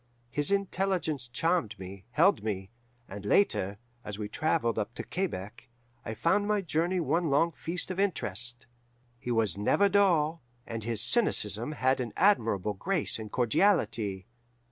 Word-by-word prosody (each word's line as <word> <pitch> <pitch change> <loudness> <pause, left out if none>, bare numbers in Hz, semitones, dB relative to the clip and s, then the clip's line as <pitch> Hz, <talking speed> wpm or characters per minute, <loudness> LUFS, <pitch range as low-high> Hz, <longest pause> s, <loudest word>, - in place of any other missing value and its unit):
His 145 +6 +2
intelligence 190 -8 -1
charmed 125 - 0
me, 95 0 -10
held 170 +11 +3
me, 95 -2 -4 0.4
and, 100 +1 -8
later, 100 - +2 0.3
as 105 -1 -6
we 105 -1 -4
travelled 135 0 0
up 110 +3 -4
to - - -5
Quebec, 120 - -5 0.3
I 110 - -5
found 190 - +1
my 210 -1 +1
journey 175 +1 0
one 165 +1 0
long 165 +5 +3
feast 170 +3 -3
of 185 - -4
interest. 120 - -2 0.5
He 125 - -7
was 110 -5 +1
never 200 - +3
dull, 170 -6 +2 0.2
and 115 -1 -5
his 115 -1 +2
cynicism 120 - +2
had 130 -2 +1
an 120 -4 -4
admirable 115 - +2
grace 170 - 0
and 110 -1 -8
cordiality. 115 - +1
130 Hz, 145 wpm, -29 LUFS, -, 0.5 s, held